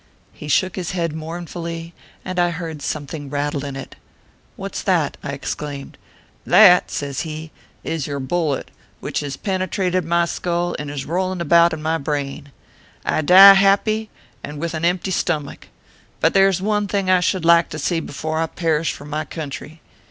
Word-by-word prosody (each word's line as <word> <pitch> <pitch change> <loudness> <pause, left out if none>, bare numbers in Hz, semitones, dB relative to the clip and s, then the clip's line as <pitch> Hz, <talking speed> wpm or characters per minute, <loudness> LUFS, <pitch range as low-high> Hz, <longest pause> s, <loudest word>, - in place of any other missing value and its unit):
He 150 - -10
shook 185 +6 +1
his 180 -2 -3
head 170 -3 -1
mournfully, 165 +1 -6 0.3
and 185 -1 -3
I 175 0 +3
heard 165 -3 -6
some 145 0 -3
thing 145 -1 -7
rattle 145 0 -2
in 140 -1 -5
it. 135 - -8 0.3
" - - -35
What - - -7
s - - -3
that - - +1
?" - - -32
I - - -5
exclaimed. 145 -2 -5 0.3
" - - -35
That," 180 -4 +7
says 140 -2 -4
he, 155 -1 -5 0.2
" - - -34
is 160 -4 -3
your 140 -1 -3
bullet, 145 +1 -2 0.3
which - - -3
has 140 -2 -5
pene 190 -2 -2
trated 185 -1 0
my 170 +1 +2
skull, 175 0 -2
and 145 0 -5
is 145 -1 -5
rolling 185 +3 -1
about 170 +1 +5
in 155 -1 -5
my 160 +1 0
brain. 140 -1 -4 0.5
I - - +1
die 190 +5 +10
happy, 205 +3 +2 0.3
and 150 - -7
with 165 +2 -3
an 160 +1 -2
empty 180 +2 0
stomach; 155 -5 -2 0.5
but - - +2
there 195 0 +5
is 190 -1 -2
one 210 0 0
thing 200 -1 -1
I 185 -1 +5
should 180 -1 0
like 170 0 +5
to - - -6
see 165 +2 0
before 155 +1 -4
I 165 - 0
perish 165 -2 0
for 145 - -11
my 150 +1 -3
country. 155 0 -7
165 Hz, 195 wpm, -21 LUFS, 150-180 Hz, 0.5 s, die